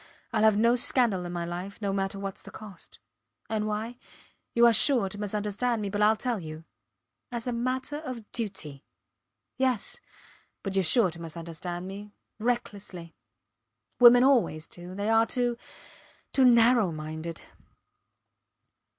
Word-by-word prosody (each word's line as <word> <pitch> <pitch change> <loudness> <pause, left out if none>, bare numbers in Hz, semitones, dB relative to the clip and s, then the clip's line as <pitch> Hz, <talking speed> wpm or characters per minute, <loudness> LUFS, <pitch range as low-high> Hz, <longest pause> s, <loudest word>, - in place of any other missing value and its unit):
Ill - - +1
have 215 -1 +5
no 230 +2 +4
scandal 240 -7 +2
in 175 - -5
my 175 -1 -3
life, 180 +4 -6
no 200 -2 -2
matter 195 0 -2
whats 195 0 -6
the - - -12
cost. 210 -4 -12 0.5
And 215 -1 -1
why? 220 +3 -4 0.6
You 235 0 +6
are 235 - +6
sure 230 -1 +5
to 205 - -8
misunderstand 210 +3 -2
me 200 -2 -3
but 205 0 -2
Ill 215 +1 +5
tell 235 -2 -3
you. 155 0 -8 0.7
As 235 -1 -4
a 250 - -1
matter 255 +4 -2
of 255 -8 -8
duty. 185 - -6 0.7
Yes. 260 -5 -1 0.6
But 195 -1 -4
youre 190 - +2
sure 190 +2 +5
to 170 0 -10
misunderstand 170 +2 -6
me 200 +2 -8 0.3
recklessly. 200 -7 -4 0.9
Women 245 0 +8
always 235 - +2
do 175 +1 -11
they 205 +2 -1
are 225 0 +4
too 245 -1 0 0.8
too 265 - +4
narrow 235 -4 +5
minded. 160 +1 -6
210 Hz, 145 wpm, -27 LUFS, 180-235 Hz, 0.9 s, Women